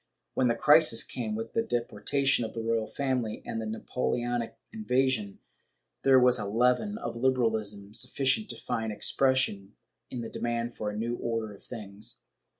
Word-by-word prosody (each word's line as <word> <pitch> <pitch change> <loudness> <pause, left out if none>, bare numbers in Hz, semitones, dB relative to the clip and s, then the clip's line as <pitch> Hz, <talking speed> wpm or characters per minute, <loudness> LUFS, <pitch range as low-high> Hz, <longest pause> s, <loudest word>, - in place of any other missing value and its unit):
When 130 - +2
the 115 - +2
crisis 150 -6 +5
came, 110 -4 -4
with 115 +1 -5
the 230 - +2
deportation 135 - +1
of 110 - -5
the 115 - -3
royal 115 -1 0
family 130 -6 -2
and 115 - -3
the 110 - -4
Napoleonic 120 +1 -2 0.2
invasion, 130 - 0 0.6
there 135 -1 +6
was 125 0 +4
a 105 - -3
leaven 125 - +2
of 225 - -5
liberalism 110 -5 0
sufficient 135 - +1
to - - -3
find 110 -1 -3
expression 115 -4 +1 0.3
in 125 - -5
the 115 - -4
demand 120 0 -2
for 105 - -3
a 105 - -5
new 120 +2 -2
order 115 -2 -2
of 100 - -16
things. 105 -3 -8
120 Hz, 160 wpm, -29 LUFS, 110-130 Hz, 0.6 s, there